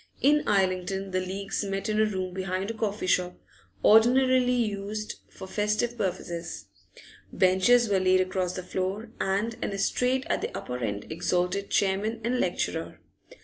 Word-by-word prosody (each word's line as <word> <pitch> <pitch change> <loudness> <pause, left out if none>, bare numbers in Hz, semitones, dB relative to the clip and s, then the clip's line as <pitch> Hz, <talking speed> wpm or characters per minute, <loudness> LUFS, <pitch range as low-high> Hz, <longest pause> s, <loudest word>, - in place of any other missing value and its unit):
In 295 +2 +3
Islington 190 -1 0
the 185 - +1
leaguers 195 +3 -3
met 195 0 -3
in 215 0 +1
a - - +5
room 185 -3 -3
behind 190 +2 -2
a - - -5
coffee 215 -3 -2
shop, 180 -1 +1 0.5
ordinarily 250 +3 +5
used 215 -3 -2
for - - -10
festive 210 +4 0
purposes; 175 -4 -4 0.7
benches 190 +6 +4
were 200 -2 +2
laid 185 0 +4
across 185 -1 -1
the 185 - -5
floor, 190 +4 -3
and 200 +4 0
an - - -2
estrade 250 +6 0
at - - 0
the - - -4
upper 125 0 -5
end 105 -4 -3
exalted 180 +4 -1
chairman 205 +4 +1
and 245 +2 0
lecturer. - - -2
195 Hz, 150 wpm, -27 LUFS, 185-220 Hz, 0.7 s, a